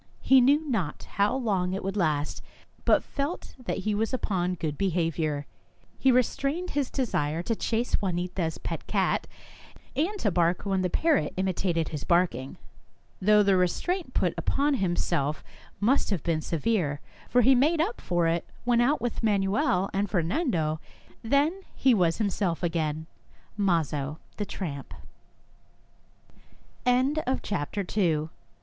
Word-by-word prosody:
He 265 -1 +6
knew 290 +5 +3
not 195 - -2
how 205 +4 0
long 195 -8 0
it 195 - -3
would 195 +1 -3
last, 155 -6 0 0.4
but - - +4
felt 285 +5 -4
that - - -2
he 215 - +1
was 225 +5 0
upon 185 -6 -1
good 155 -3 -3
behaviour. 165 -5 0 0.5
He 265 - +4
restrained 275 +8 0
his 280 -3 -1
desire 165 - -1
to 230 - -1
chase 230 +1 -1
Juanita's 175 -3 -2
pet - - -5
cat, - - +1 0.7
and 345 +10 0
to 205 - +1
bark 175 +1 +1
when 195 -2 +1
the 180 - 0
parrot 320 - +1
imitated 180 -3 0
his 150 -4 -5
barking, 165 -7 +1 0.6
though 210 +2 +5
the 195 -1 +4
restraint 340 - 0
put - - +2
upon 285 +1 +1
himself 175 - 0 0.4
must 245 +7 +2
have 195 -7 -1
been 165 -2 0
severe, 165 -4 0 0.3
for 245 - +4
he 265 +4 +7
made 300 +6 +3
up 395 +9 -1
for 175 -1 +1
it 165 +1 +1 0.2
when 240 -1 +3
out 280 +5 +2
with 240 -2 -2
Manuel 195 -3 +1
and 200 +1 0
Fer 175 -2 +1
nando. 165 - 0
195 Hz, 120 wpm, -27 LUFS, 170-250 Hz, 0.7 s, he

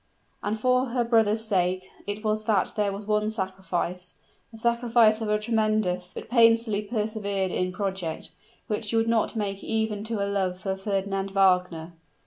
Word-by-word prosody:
And 215 +1 -2
for 255 +2 +3
her 240 0 0
brother's 225 -2 +2
sake 185 -2 0 0.2
it 205 +1 -3
was 215 0 0
that 210 -4 +1
there 205 -2 +1
was 200 +1 -6
one 210 0 +1
sacrifice 185 -3 -4 0.4
a 225 - -11
sacrifice 235 -1 +3
of 220 - -2
a 210 - +3
tremendous, 215 -5 0
but - - -7
painfully 230 -3 +4
persevered 210 -3 -2
in 185 0 -1
project 185 -4 -4 0.3
which 215 -1 -3
she 210 - -2
would 225 0 +2
not 230 0 +1
make 200 -2 -3
even 220 -2 -1
to 225 0 -2
her 200 0 -1
love 190 -2 -1
for 190 0 -2
Fernand 195 0 -2
Wagner! 180 -4 +2
210 Hz, 165 wpm, -26 LUFS, 190-220 Hz, 0.4 s, painfully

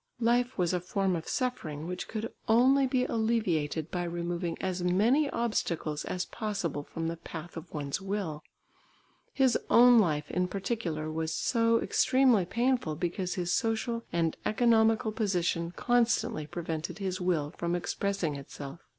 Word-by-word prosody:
Life 245 +2 +2
was 180 -2 +1
a 180 - +1
form 185 +1 0
of 165 - -5
suffering 160 - -2
which 180 +1 -5
could 225 +1 -4
only 260 +4 +5
be 255 0 +1
alleviated 175 -9 0
by 180 -1 -1
removing 170 0 -3
as 185 -1 -2
many 220 +12 +3
obstacles 170 -10 -1
as 180 -1 -2
possible 200 -9 -3
from 165 +2 -4
the 165 0 -3
path 165 +1 -8
of 165 0 -8
one's 145 +2 -3
will; 190 -6 -3 0.9
his 265 -3 +3
own 245 0 +7
life 150 -7 0
in 180 0 +1
particular 180 -6 -3
was 160 0 -2
so 230 +6 +2
extremely 255 -7 +3
painful 235 -4 0
because 175 +2 -2
his 180 -1 -1
social 230 0 0
and 165 -1 0
economical 225 0 +3
position 175 -6 0
constantly 230 -7 +1
prevented 160 +1 -4
his 190 -2 -3
will 165 -4 0
from 170 0 -1
expressing 180 -2 -1
itself. 140 +2 -8
185 Hz, 145 wpm, -30 LUFS, 165-230 Hz, 0.9 s, own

